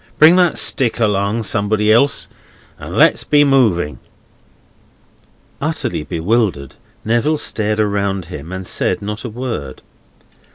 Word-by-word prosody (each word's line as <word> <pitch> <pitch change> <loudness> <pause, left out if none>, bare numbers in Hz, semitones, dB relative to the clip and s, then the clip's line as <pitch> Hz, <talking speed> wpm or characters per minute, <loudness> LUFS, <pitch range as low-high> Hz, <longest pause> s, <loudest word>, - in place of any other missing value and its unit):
Bring 160 +3 +7
that 175 -3 +3
stick 125 -2 0
along, 105 0 0
somebody 105 +1 +1
else, 140 +5 +2 0.5
and - - -8
let's - - +4
be 145 -1 +4
moving!" 110 - +1 1.6
Utterly 145 - -2
bewildered, 85 - -1 0.3
Neville 120 +8 +1
stared 110 -5 -2
around 100 -3 -1
him 80 -1 -9
and 95 0 -6
said - - -2
not 105 +1 -5
a 120 - -5
word. 115 - -6
110 Hz, 120 wpm, -17 LUFS, 95-125 Hz, 1.6 s, Bring